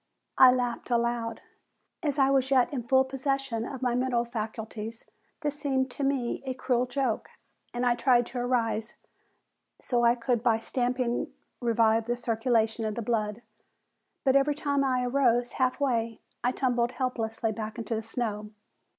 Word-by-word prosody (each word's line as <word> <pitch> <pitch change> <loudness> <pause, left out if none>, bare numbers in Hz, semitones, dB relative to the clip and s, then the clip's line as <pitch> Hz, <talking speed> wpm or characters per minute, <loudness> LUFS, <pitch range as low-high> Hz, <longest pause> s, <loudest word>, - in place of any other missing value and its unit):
I 260 -1 +10
laughed 245 -1 -2
aloud. 235 -1 0 0.6
As 295 -4 -1
I 270 -1 +4
was 265 -1 +2
yet 265 0 +3
in 260 - -1
full 265 +1 +5
possession 270 -3 -2
of 265 -1 -6
my 245 -1 +2
mental 245 -1 +1
faculties 220 -1 -6 0.4
this 295 -1 -2
seemed 265 -3 0
to 280 - -4
me 270 -3 0
a 260 -1 -3
cruel 250 -1 0
joke, 250 -3 -1 0.4
and 245 +1 -2
I 245 - +4
tried 240 0 +3
to 245 +1 -5
arise 230 -3 0 0.8
so 240 -2 0
I 235 0 +5
could 240 -1 0
by 230 -2 +3
stamping 245 +1 -1 0.3
revive 225 -2 +2
the 240 0 0
circulation 225 -1 0
of 215 -1 -2
the 235 - -3
blood, 215 0 -1 0.8
but 265 -1 +3
every 280 +1 +3
time 280 -1 0
I 255 -2 +1
arose 245 -2 +2
half 255 +1 0
way 230 -5 0 0.2
I 245 - +3
tumbled 245 -2 0
helplessly 230 -3 -2
back 215 0 -5
into 230 0 -3
the 220 - -1
snow. 220 -2 -3
245 Hz, 160 wpm, -28 LUFS, 230-260 Hz, 0.8 s, I